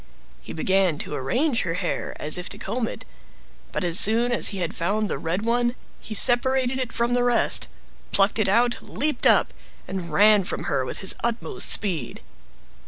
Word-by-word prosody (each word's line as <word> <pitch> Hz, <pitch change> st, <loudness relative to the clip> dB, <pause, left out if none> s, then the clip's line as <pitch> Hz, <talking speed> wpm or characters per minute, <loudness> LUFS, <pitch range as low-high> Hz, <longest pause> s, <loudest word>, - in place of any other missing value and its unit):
He -, -, -11 dB
began 185 Hz, -1 st, +1 dB
to 150 Hz, -, -6 dB
arrange 240 Hz, -, -1 dB
her 165 Hz, -2 st, -3 dB
hair 180 Hz, -1 st, -4 dB
as 155 Hz, +4 st, 0 dB
if 180 Hz, -, -6 dB
to 200 Hz, -, -8 dB
comb 235 Hz, +2 st, -3 dB
it, -, -, -8 dB, 0.7 s
but -, -, -3 dB
as 175 Hz, -1 st, +4 dB
soon 230 Hz, +3 st, +4 dB
as 240 Hz, -, +4 dB
he 200 Hz, -, 0 dB
had 175 Hz, -3 st, -3 dB
found 205 Hz, +5 st, -2 dB
the -, -, -3 dB
red 180 Hz, +6 st, -3 dB
one, 240 Hz, +1 st, 0 dB, 0.2 s
he 215 Hz, -, -6 dB
separated 260 Hz, +2 st, +3 dB
it 255 Hz, -3 st, -3 dB
from 235 Hz, +1 st, -1 dB
the 245 Hz, 0 st, +1 dB
rest, 245 Hz, -1 st, +2 dB, 0.4 s
plucked 200 Hz, +3 st, +1 dB
it 210 Hz, -, +1 dB
out, 240 Hz, +4 st, +1 dB
leaped 295 Hz, -3 st, -2 dB
up, -, -, +3 dB, 0.3 s
and 180 Hz, -3 st, -6 dB
ran 205 Hz, +4 st, +4 dB
from -, -, -4 dB
her 135 Hz, -, -1 dB
with -, -, -5 dB
his 190 Hz, -, +5 dB
utmost 235 Hz, 0 st, -2 dB
speed. 170 Hz, -, 0 dB
215 Hz, 185 wpm, -23 LUFS, 180-240 Hz, 0.7 s, his